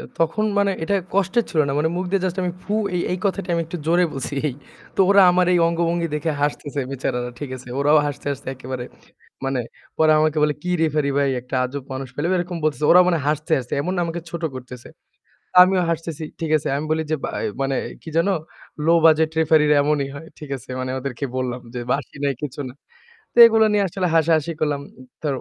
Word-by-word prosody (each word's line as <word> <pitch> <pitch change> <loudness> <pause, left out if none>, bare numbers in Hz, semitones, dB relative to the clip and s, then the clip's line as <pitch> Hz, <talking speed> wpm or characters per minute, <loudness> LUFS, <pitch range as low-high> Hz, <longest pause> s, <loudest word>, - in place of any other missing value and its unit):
এ - - -8
তখন 165 +6 +1
মানে 200 0 +3
এটা 200 - 0 0.2
কষ্টের 200 +4 +2
ছিল 155 - +2
না। - - -1
মানে 160 - +2
মুখ 185 - -1
দিয়ে 195 -2 +1
জাস্ট 180 -1 -2
আমি 180 - -1
ফু 205 - -5 0.2
এই, 175 - +1
এই 180 - -2
কথাটা 195 -1 -1
আমি 170 - +1
একটু 170 +2 -6
জোরে 175 +2 +4
বলছি 135 +1 -4
এই। 135 - -2 0.4
তো - - +2
ওরা 200 0 +7
আমার 180 0 +3
এই 175 - +4
অঙ্গভঙ্গি 170 0 0
দেখে 150 +2 -1
হাসতেছে 145 -1 -2
বেচারারা। 125 -2 -2
ঠিক 145 -3 -6
আছে? 125 0 -13
ওরাও 145 +2 +5
হাসতে, 145 0 -6
হাসতে 135 -1 -8
একেবারে 130 -1 -6 0.6
মানে, 135 -1 0 0.4
"পরে 155 -1 +4
আমাকে 155 0 +2
বলে 150 0 +2
কি 180 - -3
রেফারি 150 -2 +1
ভাই 140 -1 +2
একটা 125 +2 -8
আজব 135 +2 -5
মানুষ 130 0 -5
পেলাম।" 150 +6 -1
এরকম 175 0 -3
বলতেছে। 155 0 0
ওরাও 180 +1 +8
মানে 170 -2 +2
হাসতে, 155 +2 -1
হাসতে 125 -2 -8
এমন 180 +6 -2
না - - +1
আমাকে 170 +1 -4
ছোট 170 -1 -6
করতেছে। 125 -1 -9 0.7
আমিও 185 0 +3
হাসতেছি। 165 -1 -4 0.2
ঠিক 160 - -2
আছে? 150 - -2
আমি 150 - -3
বলি 160 0 +1
যে - - +2
ব্য - - -1 0.3
মানে 135 0 0 0.3
কি - - -10
যেন, 165 +4 +3 0.6
"লো 165 - +4
বাজেট 160 -1 +5
রেফারিরা 150 -2 +4
এমনই 145 -1 0
হয়।" 155 +3 -9
ঠিক 150 -2 -10
আছে? 120 - -15
মানে 130 0 -3
ওদেরকে 135 0 -4
বললাম 125 -1 -2
যে 125 - -3
বাঁশি 140 0 -2
নাই 140 -1 +1
কিছু 145 -1 -5
না। 125 - -11 0.6
তো - - -14
এগুলা 225 -1 +5
নিয়ে 205 - +3
আসলে 180 +1 -2
হাসাহাসি 160 0 +3
করলাম। 145 -2 0 0.4
তো 155 - -2
155 Hz, 215 wpm, -22 LUFS, 140-175 Hz, 0.7 s, ওরাও